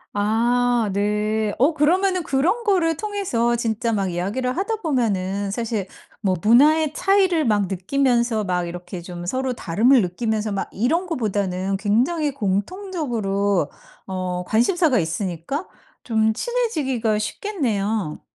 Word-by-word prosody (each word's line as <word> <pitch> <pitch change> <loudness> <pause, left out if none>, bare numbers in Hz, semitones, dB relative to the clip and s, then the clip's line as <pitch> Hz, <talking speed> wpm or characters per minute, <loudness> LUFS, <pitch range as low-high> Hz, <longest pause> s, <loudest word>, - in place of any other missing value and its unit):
아, 235 +2 +2
네. 210 +1 0
어 285 +7 +3
그러면은 365 +5 +2
그런 325 - 0
거를 350 -7 +2
통해서 360 - 0
진짜 230 0 -1
막 195 -3 0
이야기를 205 +9 -2
하다 400 +6 -1
보면은 205 - -1
사실 220 -2 -2 0.3
뭐 190 -3 +1
문화의 295 - +4
차이를 375 -3 +2
막 210 -3 +2
느끼면서 235 +3 +1
막 180 -2 -1
이렇게 175 +1 -7
좀 175 0 -8
서로 260 +6 -1
다름을 235 +5 +3
느끼면서 215 +4 -2
막 195 - -3
이런 315 - 0
거보다는 195 - -1
굉장히 255 - +1
공통적으로 205 - -1 0.3
어 185 -1 -3
관심사가 255 - +2
있으니까 180 - -3 0.4
좀 220 -2 +2
친해지기가 280 - -1
쉽겠네요. 215 - -2
230 Hz, 285 characters per minute, -22 LUFS, 200-300 Hz, 0.4 s, 문화의